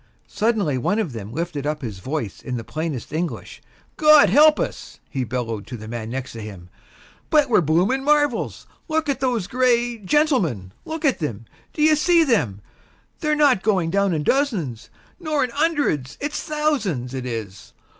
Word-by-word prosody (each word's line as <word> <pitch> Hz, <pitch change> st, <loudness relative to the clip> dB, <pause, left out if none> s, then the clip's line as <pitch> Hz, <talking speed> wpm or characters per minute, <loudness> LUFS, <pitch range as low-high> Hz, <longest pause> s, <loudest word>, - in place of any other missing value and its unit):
Suddenly 210 Hz, -, 0 dB
one 175 Hz, -, 0 dB
of 185 Hz, -, -2 dB
them 110 Hz, -2 st, -7 dB
lifted 155 Hz, -1 st, -3 dB
up 150 Hz, -1 st, -3 dB
his 105 Hz, -6 st, -5 dB
voice 130 Hz, -1 st, -4 dB
in 125 Hz, -2 st, -4 dB
the 115 Hz, -, -5 dB
plainest 155 Hz, +1 st, -5 dB
English. 165 Hz, +2 st, -4 dB, 0.4 s
"Gawd 305 Hz, -1 st, +7 dB
help 305 Hz, +1 st, +6 dB
us!" -, -, -5 dB
he 135 Hz, -2 st, -2 dB
bellowed 115 Hz, -4 st, -4 dB
to 125 Hz, -, -6 dB
the 110 Hz, 0 st, -9 dB
man 115 Hz, -1 st, -5 dB
next 130 Hz, +1 st, -5 dB
to 115 Hz, -, -8 dB
him, 95 Hz, -5 st, -9 dB, 0.6 s
"but 300 Hz, -3 st, +4 dB
we're 215 Hz, -, +5 dB
blooming 180 Hz, -, +1 dB
marvels! 290 Hz, -4 st, +1 dB, 0.2 s
Look 315 Hz, -2 st, -1 dB
at 280 Hz, -, 0 dB
those 245 Hz, -7 st, 0 dB
gray... 240 Hz, 0 st, +1 dB
gentlemen, 190 Hz, -, +1 dB
look 320 Hz, 0 st, -4 dB
at 270 Hz, -, +2 dB
them! 115 Hz, -, -4 dB, 0.3 s
D'ye 310 Hz, +1 st, +4 dB
see 335 Hz, +2 st, +4 dB
them? 125 Hz, -, 0 dB, 0.6 s
They're 305 Hz, -2 st, +1 dB
not 285 Hz, -9 st, +4 dB
going 190 Hz, -6 st, +1 dB
down 200 Hz, 0 st, +2 dB
in 155 Hz, -3 st, -1 dB
dozens 185 Hz, -, -1 dB, 0.3 s
nor 310 Hz, -5 st, 0 dB
in 250 Hz, -, -2 dB
'undreds; 290 Hz, -, 0 dB
it's 290 Hz, +1 st, -3 dB
thousands, 255 Hz, -, -1 dB
it 130 Hz, -1 st, -4 dB
is. 110 Hz, -5 st, -7 dB
185 Hz, 170 wpm, -22 LUFS, -, 0.6 s, Gawd